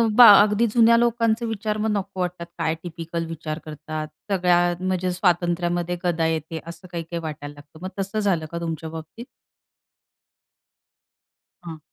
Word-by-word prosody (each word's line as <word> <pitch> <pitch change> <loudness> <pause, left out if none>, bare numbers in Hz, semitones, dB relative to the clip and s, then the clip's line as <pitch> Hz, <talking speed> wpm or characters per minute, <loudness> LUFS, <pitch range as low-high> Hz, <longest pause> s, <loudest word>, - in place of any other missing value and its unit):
बा 245 -1 +10
अगदी 210 +2 +3
जुन्या 230 -1 +6
लोकांचे 230 -1 +2
विचार 215 -1 -2
मग - - +1
नको 195 -2 -3
वाटतात 180 -1 -3
काय 160 +1 0
टिपिकल 165 -1 -5
विचार 160 -1 -5
करतात. 155 0 -6 0.2
सगळ्या 180 -2 +3 0.2
म्हणजे 185 -1 -1
स्वातंत्र्यामध्ये 175 -1 0
गदा 170 -2 +1
येते 160 0 -3
असं 170 +2 -10
काही-काही 170 0 -4
वाटायला 145 -2 -6
लागतं. 145 +2 -16
मग 185 - -3
तसं 195 +3 -2
झालं 185 -6 +1
का 170 - -4
तुमच्या 165 -1 -4
बाबतीत? 160 +9 -9 2.4
हां. 160 -2 -7
175 Hz, 140 wpm, -23 LUFS, 160-195 Hz, 2.4 s, बा